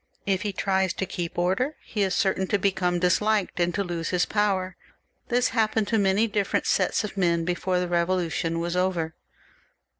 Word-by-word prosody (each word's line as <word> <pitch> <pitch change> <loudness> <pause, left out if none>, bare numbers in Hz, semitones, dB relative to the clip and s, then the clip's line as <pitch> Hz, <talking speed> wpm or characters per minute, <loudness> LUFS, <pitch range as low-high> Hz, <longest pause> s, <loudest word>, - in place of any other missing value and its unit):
If 195 -1 +1
he 210 -1 -2
tries 190 -1 0
to 190 - -3
keep 175 -2 -5
order, 190 - 0
he 210 - -3
is 190 -1 +1
certain 190 -1 +1
to 205 - +2
become 185 -2 +1
disliked 200 +3 +1
and 175 0 +2
to 200 - 0
lose 170 -2 -3
his 180 -1 +1
power. 190 -3 0 0.5
This 245 0 +2
happened 220 -2 +1
to 225 - +2
many 200 +2 +3
different 205 -3 -1
sets - - +1
of 210 -1 -6
men 170 -3 +2
before 180 +1 0
the 180 - 0
Eevolution 170 -1 0
was 170 +1 -2
over. 180 -3 0
190 Hz, 180 wpm, -25 LUFS, 175-205 Hz, 0.5 s, many